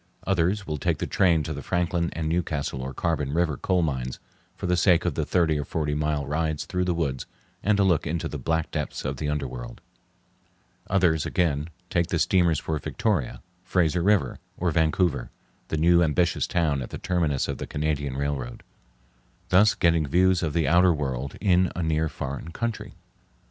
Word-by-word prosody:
Others 95 Hz, +2 st, +1 dB
will 75 Hz, -3 st, -3 dB
take -, -, 0 dB
the -, -, -2 dB
train 85 Hz, -5 st, +2 dB
to 80 Hz, +1 st, -4 dB
the 70 Hz, -, -6 dB
Franklin 85 Hz, 0 st, 0 dB
and 80 Hz, -1 st, -3 dB
Newcastle 80 Hz, -5 st, -1 dB
or 65 Hz, +1 st, -4 dB
Carbon 75 Hz, 0 st, -1 dB
River 85 Hz, -2 st, +1 dB
coal 90 Hz, +5 st, +1 dB
mines 65 Hz, -5 st, -2 dB, 0.4 s
for -, -, -6 dB
the 90 Hz, -, +2 dB
sake 85 Hz, -1 st, +3 dB
of -, -, +1 dB
the -, -, -2 dB
thirty 80 Hz, -4 st, +2 dB
or -, -, -1 dB
forty 75 Hz, +1 st, -2 dB
mile 75 Hz, -1 st, -1 dB
rides 80 Hz, +1 st, -1 dB
through 90 Hz, -2 st, -1 dB
the 90 Hz, -1 st, 0 dB
woods, 70 Hz, -6 st, -2 dB, 0.3 s
and 105 Hz, 0 st, +2 dB
a 100 Hz, -, +4 dB
look 85 Hz, -5 st, +2 dB
into 80 Hz, +1 st, -2 dB
the -, -, -6 dB
black 80 Hz, 0 st, -1 dB
depths 75 Hz, -2 st, -4 dB
of 65 Hz, +1 st, -2 dB
the 75 Hz, +2 st, -2 dB
underworld. 65 Hz, -5 st, -4 dB, 1.1 s
Others 85 Hz, -5 st, +2 dB
again 80 Hz, -4 st, 0 dB, 0.2 s
take 85 Hz, -1 st, +1 dB
the 85 Hz, -, -1 dB
steamers 85 Hz, -2 st, +3 dB
for 80 Hz, 0 st, -2 dB
Victoria, 90 Hz, -, -2 dB, 0.2 s
Fraser 90 Hz, -2 st, +1 dB
River, 100 Hz, +2 st, +2 dB, 0.2 s
or 90 Hz, -1 st, 0 dB
Vancouver, 80 Hz, -3 st, +1 dB, 0.4 s
the 80 Hz, -, -2 dB
new 85 Hz, +2 st, +5 dB
ambitious 85 Hz, +1 st, +1 dB
town 80 Hz, -6 st, +1 dB
at 60 Hz, -, -6 dB
the -, -, -6 dB
terminus 80 Hz, -7 st, 0 dB
of -, -, -4 dB
the -, -, -5 dB
Canadian 75 Hz, -3 st, -2 dB
Railroad, 70 Hz, -4 st, -3 dB, 0.9 s
thus 100 Hz, +2 st, +5 dB
getting 85 Hz, -4 st, +2 dB
views 90 Hz, +4 st, +3 dB
of 80 Hz, -4 st, -1 dB
the 80 Hz, 0 st, +1 dB
outer 90 Hz, +1 st, +5 dB
world 70 Hz, -2 st, -3 dB
in 90 Hz, -3 st, +3 dB
a 90 Hz, -, -2 dB
near 80 Hz, 0 st, +1 dB
foreign 70 Hz, +3 st, -5 dB
country. 115 Hz, +5 st, -4 dB
80 Hz, 185 wpm, -25 LUFS, 75-90 Hz, 1.1 s, new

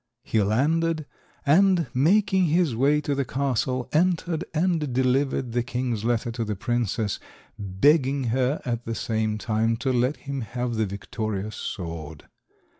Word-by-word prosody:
He 110 Hz, -, +1 dB
landed, 155 Hz, +9 st, +1 dB, 0.4 s
and, 180 Hz, +3 st, +4 dB
making 190 Hz, +7 st, +3 dB
his 165 Hz, -5 st, +2 dB
way 145 Hz, +5 st, +3 dB
to 145 Hz, -, -1 dB
the 140 Hz, 0 st, 0 dB
castle, 130 Hz, -1 st, -1 dB
entered 170 Hz, 0 st, +1 dB
and 160 Hz, -3 st, 0 dB
delivered 130 Hz, 0 st, +1 dB
the 120 Hz, +1 st, +1 dB
king's 120 Hz, -2 st, -2 dB
letter 120 Hz, 0 st, 0 dB
to 115 Hz, 0 st, -3 dB
the 105 Hz, -1 st, -3 dB
princess, 115 Hz, -1 st, -1 dB, 0.4 s
begging 135 Hz, -, +2 dB
her 130 Hz, +3 st, +1 dB
at 120 Hz, -1 st, -2 dB
the 115 Hz, -, -2 dB
same 110 Hz, -1 st, -1 dB
time 110 Hz, +1 st, 0 dB
to 130 Hz, +2 st, -1 dB
let 125 Hz, +4 st, +1 dB
him 140 Hz, -1 st, -5 dB
have 120 Hz, +1 st, -3 dB
the 110 Hz, -2 st, 0 dB
victorious 105 Hz, +1 st, -4 dB
sword. 80 Hz, -4 st, -6 dB
125 Hz, 145 wpm, -25 LUFS, 110-150 Hz, 0.4 s, and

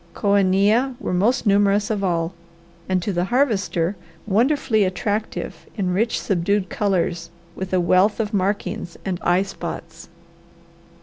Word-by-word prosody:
Coenia 205 Hz, +5 st, +2 dB
were 220 Hz, -, -3 dB
most 230 Hz, +8 st, +2 dB
numerous 205 Hz, +1 st, +3 dB
of 205 Hz, -2 st, -1 dB
all 170 Hz, -1 st, 0 dB, 0.6 s
and 185 Hz, -2 st, +1 dB
to 200 Hz, -, -2 dB
the 175 Hz, 0 st, 0 dB
Harvester 205 Hz, -7 st, +1 dB, 0.3 s
wonderfully 225 Hz, +1 st, +2 dB
attractive 205 Hz, +3 st, -3 dB
in 185 Hz, -3 st, 0 dB
rich, 225 Hz, +5 st, +1 dB
subdued 195 Hz, 0 st, 0 dB
colours 175 Hz, -4 st, -1 dB, 0.2 s
with 190 Hz, +1 st, -6 dB
a 185 Hz, -, +2 dB
wealth 185 Hz, +5 st, +3 dB
of 215 Hz, -2 st, -2 dB
markings 195 Hz, -3 st, -2 dB
and 185 Hz, -2 st, -2 dB
eye 180 Hz, +2 st, +3 dB
spots. 170 Hz, -3 st, -8 dB
195 Hz, 130 wpm, -22 LUFS, 180-210 Hz, 0.6 s, numerous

